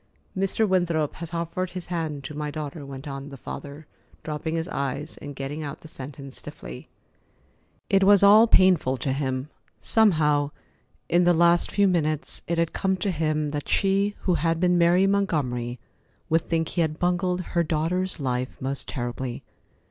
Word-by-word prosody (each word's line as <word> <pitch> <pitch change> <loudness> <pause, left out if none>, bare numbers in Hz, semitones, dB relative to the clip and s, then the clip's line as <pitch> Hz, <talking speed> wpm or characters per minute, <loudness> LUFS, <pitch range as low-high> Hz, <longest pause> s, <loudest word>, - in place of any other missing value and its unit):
"Mr. 195 +3 +1
Winthrop 170 -5 +1
has 170 0 -7
offered 170 +2 -2
his 180 -1 -7
hand 160 -5 -3
to 150 - -7
my 150 0 -3
daughter," 150 0 -6
went 135 +1 -8
on 140 0 -6
the 140 - -9
father, 145 +4 -8 0.4
dropping 155 +1 -3
his 165 +1 -2
eyes 140 -2 -3
and 145 - -8
getting 140 +3 -4
out 145 -2 -6
the - - -11
sentence 135 -2 -8
stiffly. 60 - -9 1.0
It 195 0 +3
was 200 0 +6
all 210 +3 +8
painful 180 - +4
to 130 +2 -1
him. 130 0 -2 0.3
Somehow, 155 -10 +3 0.6
in 175 +1 +3
the 175 0 +4
last 170 +1 +4
few 200 0 +3
minutes, 155 -4 0
it 170 - -1
had 165 -1 +1
come 190 -1 0
to 190 +2 -1
him 155 -2 0
that 145 -1 -4
she 200 +1 +2
who 185 - +1
had 165 -1 +1
been 180 0 +3
Mary 175 +2 +4
Montgomery 140 -12 0 0.5
would 165 0 +2
think 165 -1 0
he 175 - 0
had 155 -1 0
bungled 180 +1 0
her 170 - +3
daughter's 170 +3 -1
life 130 -2 -2
most 135 +1 -3
terribly. 120 -1 -4
160 Hz, 170 wpm, -25 LUFS, 145-180 Hz, 1.0 s, all